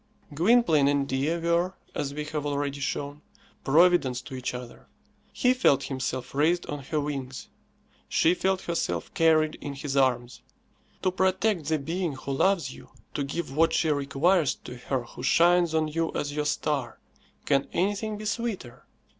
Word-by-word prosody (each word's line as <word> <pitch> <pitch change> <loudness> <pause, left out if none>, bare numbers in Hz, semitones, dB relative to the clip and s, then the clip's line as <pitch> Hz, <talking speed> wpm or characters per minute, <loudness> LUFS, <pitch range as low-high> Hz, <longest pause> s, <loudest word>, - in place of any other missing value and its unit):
Gwynplaine 165 - +4
and 140 -1 +1
Dea 140 +6 0
were, 170 +2 0 0.2
as 140 - -2
we 150 +1 -4
have 150 -1 -3
already 145 -1 -2
shown, 145 +1 -3 0.4
Providence 150 -4 +4
to 135 +1 -11
each 130 -1 -4
other. 125 -1 -9 0.4
He 250 0 +3
felt 250 - +3
himself 130 -1 -4
raised 160 +5 +2
on 145 - -5
her 155 +2 -1
wings; 135 -3 -5 0.6
she 165 - +3
felt 190 +1 0
herself 85 - -2
carried 155 -1 +3
in 145 -1 -5
his 140 0 -4
arms. 125 -2 +1 0.6
To 185 - +2
protect 190 -1 +1
the 155 +1 +1
being 165 +3 -2
who 135 +1 -6
loves 185 +6 +1
you, - - -14 0.2
to 145 - -1
give 140 0 -4
what 165 +1 +3
she 160 -1 +2
requires 145 +3 +2
to 125 - -8
her 125 0 -2
who 120 - -11
shines 170 +4 +4
on 160 -1 +2
you 165 +1 -1
as 145 0 -2
your 150 0 -1
star, 140 -5 -1 0.5
can 140 -1 +2
anything 205 +3 -1
be 215 - -8
sweeter? 220 - -4
150 Hz, 165 wpm, -27 LUFS, 135-175 Hz, 0.6 s, Gwynplaine